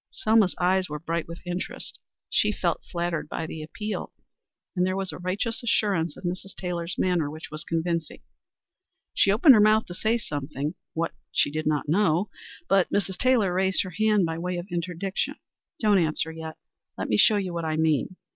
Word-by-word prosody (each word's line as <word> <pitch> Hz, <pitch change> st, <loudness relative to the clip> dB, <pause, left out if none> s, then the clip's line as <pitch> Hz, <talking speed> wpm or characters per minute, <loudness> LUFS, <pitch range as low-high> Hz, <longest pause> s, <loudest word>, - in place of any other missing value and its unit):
Selma's 220 Hz, -, +3 dB
eyes 185 Hz, 0 st, +2 dB
were 150 Hz, -, -3 dB
bright 165 Hz, +2 st, -3 dB
with 170 Hz, +2 st, -10 dB
interest. 180 Hz, +1 st, -5 dB, 0.3 s
She -, -, +3 dB
felt -, -, -1 dB
flattered 170 Hz, -3 st, -2 dB
by 160 Hz, -, -3 dB
the 160 Hz, 0 st, -6 dB
appeal, 210 Hz, +7 st, -5 dB, 0.6 s
and 180 Hz, -, +2 dB
there 185 Hz, 0 st, +1 dB
was 195 Hz, -1 st, -2 dB
a -, -, -8 dB
righteous 195 Hz, +6 st, -2 dB
assurance 195 Hz, -9 st, +1 dB
in -, -, -12 dB
Mrs. 185 Hz, +2 st, -4 dB
Taylor's 175 Hz, -1 st, -3 dB
manner 175 Hz, -5 st, +1 dB
which 155 Hz, +1 st, -9 dB
was 155 Hz, 0 st, -6 dB
convincing. 165 Hz, -1 st, -2 dB, 0.9 s
She -, -, +3 dB
opened 260 Hz, -, +7 dB
her 215 Hz, -, +6 dB
mouth 215 Hz, +1 st, +5 dB
to 175 Hz, -, -8 dB
say 220 Hz, +6 st, +1 dB
something 145 Hz, -, -4 dB, 0.2 s
what 165 Hz, 0 st, -1 dB, 0.2 s
she -, -, +2 dB
did 155 Hz, +1 st, -2 dB
not 150 Hz, -1 st, +1 dB
quite 150 Hz, -, -2 dB
know 190 Hz, 0 st, +2 dB, 0.4 s
but 195 Hz, -2 st, +3 dB
Mrs. 190 Hz, -2 st, -1 dB
Taylor 240 Hz, -8 st, +3 dB
raised 190 Hz, +1 st, +2 dB
her 185 Hz, -, -7 dB
hand 215 Hz, -2 st, +3 dB
by 165 Hz, 0 st, -3 dB
way 180 Hz, +1 st, -2 dB
of 175 Hz, -, -4 dB
interdiction. 175 Hz, +2 st, -2 dB, 0.4 s
"Don't 210 Hz, -6 st, +4 dB
answer 160 Hz, -1 st, +1 dB
yet. 160 Hz, -1 st, -7 dB, 0.4 s
Let -, -, -3 dB
me 105 Hz, -, +2 dB
show 215 Hz, -, +6 dB
you 190 Hz, -3 st, -2 dB
what 170 Hz, -1 st, -3 dB
I 155 Hz, -1 st, 0 dB
mean. 160 Hz, +2 st, +1 dB
180 Hz, 190 wpm, -26 LUFS, 160-195 Hz, 0.9 s, opened